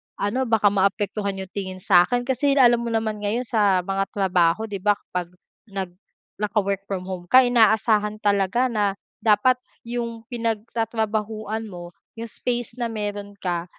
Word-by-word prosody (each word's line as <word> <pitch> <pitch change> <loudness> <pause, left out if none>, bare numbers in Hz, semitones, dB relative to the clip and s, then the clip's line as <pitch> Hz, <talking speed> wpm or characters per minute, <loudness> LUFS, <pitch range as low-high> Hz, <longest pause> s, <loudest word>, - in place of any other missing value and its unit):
ano 245 +6 -1
baka 215 -3 +3
maapektuhan 200 +1 0
yung 190 -1 -7
tingin 190 -2 -6
sa'kin, 200 +5 +4
kasi 275 +2 +1
alam 240 -3 +6
mo 235 - -4
naman 220 -2 -1
ngayon 210 +4 -1
sa 205 -6 +2
mga 195 +1 -1
trabaho, 185 0 +2
'di 200 - -3
ba, 205 +1 +3
kapag 180 -1 -6 0.3
nag 195 -3 -4 0.4
naka-work 200 -2 -1
from 185 -2 -3
home 180 -2 -7
ka 255 0 +7
inaasahan 220 -3 +3
talaga 205 +4 +2
na 205 -5 0 0.2
dapat 220 +4 +4 0.3
yung 235 -1 -4
pinagtatrabahuan 220 -1 -2
mo 175 -2 -9 0.2
yung 230 - -5
space 240 0 -3
na - - +1
meron 205 -2 -4
ka, 175 -2 -2
210 Hz, 150 wpm, -23 LUFS, 195-230 Hz, 0.4 s, ka